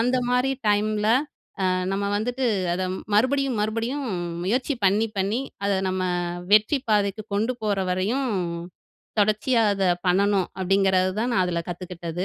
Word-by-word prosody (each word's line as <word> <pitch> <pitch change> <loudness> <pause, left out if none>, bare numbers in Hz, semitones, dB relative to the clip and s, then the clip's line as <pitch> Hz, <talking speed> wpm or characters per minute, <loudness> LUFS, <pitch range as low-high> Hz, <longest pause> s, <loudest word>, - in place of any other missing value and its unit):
அந்த 250 +2 +2
மாதிரி 250 +2 +2 0.2
டைம்ல 210 +1 +1 0.6
அ - - +3 0.2
நம்ம 200 +1 -1
வந்துட்டு, 245 +4 -1 0.3
அத 185 - -2 0.3
மறுபடியும், 260 +3 +2
மறுபடியும் 230 +6 -2 0.4
முயற்சி 255 +8 0
பண்ணி 210 +4 +3
பண்ணி 200 +5 0 0.3
அத 200 - +2 0.2
நம்ம 185 0 -1 0.5
வெற்றி 215 +7 +5
பாதைக்கு 205 0 +1
கொண்டுபோற 215 -1 0
வரையும், 220 +9 0 0.9
தொடர்ச்சியா 215 +4 +2
அத 195 -1 -1 0.2
பண்ணணும். 195 0 +2
அப்டிங்குறது 190 0 +2
தான் 245 +2 0
நான் 190 - +3
அதுல 170 -1 -1
கத்துக்கிட்டது. 175 0 -5
210 Hz, 125 wpm, -24 LUFS, 190-245 Hz, 0.9 s, வெற்றி